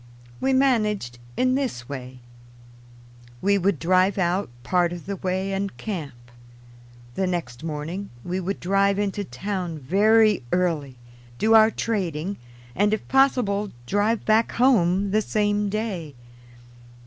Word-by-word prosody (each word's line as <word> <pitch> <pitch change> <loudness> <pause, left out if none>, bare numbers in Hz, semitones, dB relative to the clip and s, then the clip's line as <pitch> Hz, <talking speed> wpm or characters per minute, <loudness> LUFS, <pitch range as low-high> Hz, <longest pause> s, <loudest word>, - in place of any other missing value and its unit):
We 265 - +1
managed 215 - +1 0.2
in 255 0 +2
this 250 - -2
way: 130 -2 -8 1.2
we 200 +4 +2
would 190 -2 +1
drive 185 +5 +2
out 185 0 0
part 175 +5 +1
of 175 -1 -7
the 200 0 -4
way 190 +1 -2
and 195 0 -3
camp; 140 - -6 0.8
the 190 +6 -1
next 160 -7 -4
morning 165 +5 -5
we 180 +1 -2
would 190 +2 -3
drive 195 +2 +2
into 205 0 -1
town 185 -4 -4
very 210 - +3
early, 165 -7 0 0.4
do 220 - +3
our 220 0 +7
trading, 195 -5 -2 0.4
and 205 +2 +3
if 215 - -11
possible, 245 -7 +2 0.2
drive 205 - 0
back 220 +1 +3
home 200 -6 +3
the 215 +2 +3
same 205 -1 0
day. 195 - -4
195 Hz, 130 wpm, -24 LUFS, 170-210 Hz, 1.2 s, our